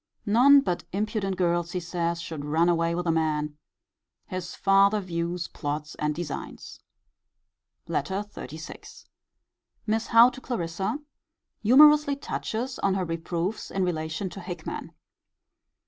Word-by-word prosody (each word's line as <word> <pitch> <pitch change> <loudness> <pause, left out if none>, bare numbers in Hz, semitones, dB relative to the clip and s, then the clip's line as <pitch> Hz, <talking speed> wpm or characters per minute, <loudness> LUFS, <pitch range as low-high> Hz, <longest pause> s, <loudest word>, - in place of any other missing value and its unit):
None 255 +7 +7
but 180 -9 -2
impudent 200 -1 -2
girls, 175 -1 0
he 180 - -1
says, 170 0 -2
should 160 -3 -6
run 160 +4 +2
away 170 0 +1
with 175 +1 -2
a 165 - +2
man. 150 -2 0 0.7
His 185 -1 -6
farther 200 +1 +4
views, 170 -2 -3
plots, 150 +1 -4
and 150 0 -2
designs. 160 -3 -6 1.1
LETTER 195 +2 -1
XXXVI. 160 +1 -9 0.8
Miss 225 +1 0
Howe 230 +2 +7
to 260 - -11
Clarissa. 190 - -2 0.6
Humourously 290 +5 +6
touches 255 -2 -4
on 195 -1 +1
her 190 -2 -1
reproofs 170 +4 -3
in 195 - -1
relation 160 +1 -2
to - - -8
Hickman. 175 -3 -6
180 Hz, 125 wpm, -26 LUFS, 165-210 Hz, 1.1 s, None